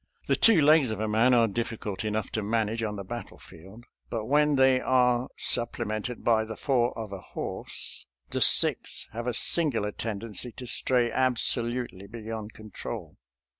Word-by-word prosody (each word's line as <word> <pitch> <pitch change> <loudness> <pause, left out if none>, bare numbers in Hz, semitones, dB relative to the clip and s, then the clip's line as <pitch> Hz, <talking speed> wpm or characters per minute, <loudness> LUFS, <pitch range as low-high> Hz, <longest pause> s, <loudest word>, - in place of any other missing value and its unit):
The - - +2
two 225 -8 +5
legs 150 -3 +5
of 110 - -4
a 110 - -1
man 115 +4 +4
are 115 -1 +4
difficult 110 -2 -4
enough 110 0 -2
to 110 - -2
manage 110 +1 -1
on 105 -2 -2
the 100 - -6
battlefield, 100 -1 -10 0.2
but 115 -2 -3
when 150 +3 +3
they 130 -1 +4
are 125 -1 +2
supple 120 0 0
mented 110 +3 -4
by 110 -2 +3
the 110 0 -7
four 125 -3 +1
of 110 -3 -6
a 95 - -7
horse, - - -6 0.2
the - - -2
six - - +3
have 120 +2 -5
a 125 - 0
singular 120 -8 +2
tendency 115 +2 -4
to 125 - -9
stray 120 0 +2
absolutely 120 -5 0
beyond 110 -1 -7
control. 110 -2 -8
115 Hz, 165 wpm, -27 LUFS, 110-125 Hz, 0.2 s, two